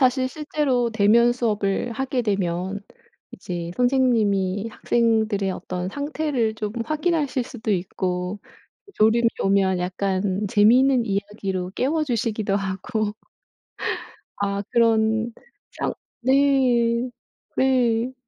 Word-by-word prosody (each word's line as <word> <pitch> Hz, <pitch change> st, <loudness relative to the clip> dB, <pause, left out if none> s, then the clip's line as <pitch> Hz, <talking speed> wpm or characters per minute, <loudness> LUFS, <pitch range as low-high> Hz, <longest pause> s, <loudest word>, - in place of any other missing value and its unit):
사실 255 Hz, 0 st, +3 dB
실제로 280 Hz, -5 st, 0 dB
대면 225 Hz, +2 st, +4 dB
수업을 220 Hz, -1 st, -1 dB
하게 260 Hz, +1 st, -1 dB
되면 190 Hz, -2 st, -1 dB, 0.5 s
이제 175 Hz, -2 st, -5 dB
선생님이 225 Hz, -6 st, +2 dB
학생들의 220 Hz, -4 st, +1 dB
어떤 180 Hz, -1 st, -4 dB
상태를 285 Hz, -3 st, -1 dB
좀 210 Hz, -1 st, -4 dB
확인하실 305 Hz, -2 st, 0 dB
수도 220 Hz, -4 st, -3 dB
있고 180 Hz, +1 st, -2 dB, 0.6 s
졸음이 230 Hz, +2 st, +4 dB
오면 195 Hz, -1 st, +2 dB
약간 190 Hz, +2 st, -1 dB
재미있는 240 Hz, +5 st, +4 dB
이야기로 195 Hz, -2 st, -3 dB
깨워주시기도 235 Hz, -8 st, 0 dB
하고. 205 Hz, +3 st, -2 dB, 1.3 s
아 200 Hz, 0 st, 0 dB
그런 225 Hz, -1 st, +2 dB, 0.4 s
상 -, -, -3 dB, 0.3 s
네. 255 Hz, -3 st, +3 dB, 0.5 s
네. 250 Hz, -2 st, +2 dB
220 Hz, 220 characters per minute, -23 LUFS, 200-250 Hz, 1.3 s, 대면